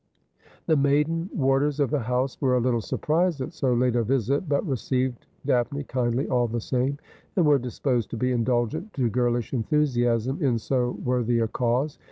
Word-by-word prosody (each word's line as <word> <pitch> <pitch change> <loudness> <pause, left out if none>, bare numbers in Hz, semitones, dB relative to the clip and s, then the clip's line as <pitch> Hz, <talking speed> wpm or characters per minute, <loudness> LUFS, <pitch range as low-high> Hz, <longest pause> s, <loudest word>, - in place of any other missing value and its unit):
The 160 - +3
maiden 150 +5 +1
warders 135 +1 +1
of 140 -3 +1
the 150 - +1
house 125 +2 -1
were 130 -3 +3
a - - +3
little 120 -1 +1
surprised 165 - 0
at 135 +6 -5
so 130 -6 0
late 125 0 +2
a 120 - +2
visit, 135 - 0
but 140 +6 +1
received 130 - -2 0.2
Daphne 140 +2 0
kindly 125 0 -1
all 120 -1 +1
the 120 +1 -2
same, 130 +4 -1 0.4
and 180 - +3
were 145 -2 +5
disposed 125 -1 -1
to 120 - -5
be 125 +3 0
indulgent 125 - -1
to 125 -5 0
girlish 120 0 0
enthusiasm 125 - +1
in 130 -5 +2
so 125 +2 -1
worthy 120 -1 +1
a 115 -1 +1
cause. 125 +6 -1
130 Hz, 180 wpm, -25 LUFS, 120-140 Hz, 0.4 s, were